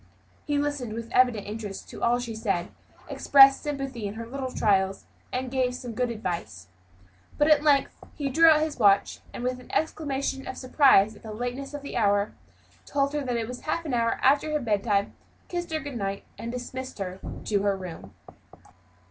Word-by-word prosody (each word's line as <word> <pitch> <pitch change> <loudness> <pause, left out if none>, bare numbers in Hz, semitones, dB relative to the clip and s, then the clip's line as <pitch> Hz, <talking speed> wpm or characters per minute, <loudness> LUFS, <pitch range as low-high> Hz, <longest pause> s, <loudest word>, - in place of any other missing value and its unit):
He 290 - +1
listened 285 -6 -2
with 230 +1 -6
evident 245 -5 +3
interest 210 -2 -6
to - - -9
all 240 +1 +3
she 245 -2 -5
said, 200 -5 -1 0.4
expressed 275 -1 +6
sympathy 275 -7 -4
in 200 - -6
her 230 +1 -6
little 260 +2 -5
trials, 195 -4 +1 0.3
and 255 0 -3
gave 260 -1 +2
her - - -4
some 245 -2 -6
good 250 +2 0
advice. 170 - -5 0.7
But 295 +1 +3
at 300 -2 +6
length 285 -3 +3 0.2
he 285 - -2
drew 325 +5 +6
out 305 -1 +5
his 310 -1 -2
watch, 200 -2 +4
and - - -7
with 255 0 -1
an 250 - -14
exclamation 275 -3 -2
of - - -6
surprise 255 -6 +4
at - - -16
the 220 - -8
lateness 245 +5 -5
of 290 - -7
the 280 - -5
hour, 205 -2 +2 0.5
told 280 0 0
her 300 - 0
it 240 -5 -2
was 250 +1 -7
half 335 +2 -2
an 290 - -3
hour 230 -1 +2
after 285 +3 +4
her 300 - +2
bedtime, 205 -4 0 0.4
kissed 350 -1 -4
her 315 - 0
good 285 -4 -6
night, 195 -2 -3
and 230 - -6
dismissed 255 +1 -6
her 190 -2 -5 0.3
to 205 -2 +1
her 200 -1 +1
room. 180 -3 -9
245 Hz, 190 wpm, -26 LUFS, 210-275 Hz, 0.7 s, expressed